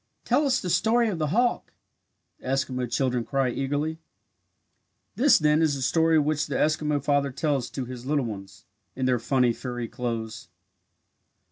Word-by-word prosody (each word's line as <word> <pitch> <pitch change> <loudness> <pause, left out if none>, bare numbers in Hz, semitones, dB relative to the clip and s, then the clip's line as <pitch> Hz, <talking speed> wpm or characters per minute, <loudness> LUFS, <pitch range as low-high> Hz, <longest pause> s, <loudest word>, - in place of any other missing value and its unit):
"Tell 290 0 +2
us 260 -1 +2
the 180 - -3
story 230 +4 +3
of 180 -6 -3
the 155 - 0
hawk!" 240 +10 0 0.7
the - - -11
Eskimo 130 -2 -1
children 125 -3 0
cry 135 0 0
eagerly. 145 +5 -2 1.2
This 280 +4 +5
then 150 0 +3
is 155 -3 +2
the 135 - -4
story 160 +3 +3
which 150 0 +1
the 140 - -4
Eskimo 150 -1 +1
father 145 -1 +1
tells 140 -3 -1
to 130 - -5
his 125 0 -8
little 145 -3 +1
ones 100 -1 -8 0.3
"in 130 - -2
their 125 -2 +2
funny 125 0 +2
furry 120 -1 -5
clothes." 115 -2 -5
140 Hz, 160 wpm, -26 LUFS, 125-155 Hz, 1.2 s, This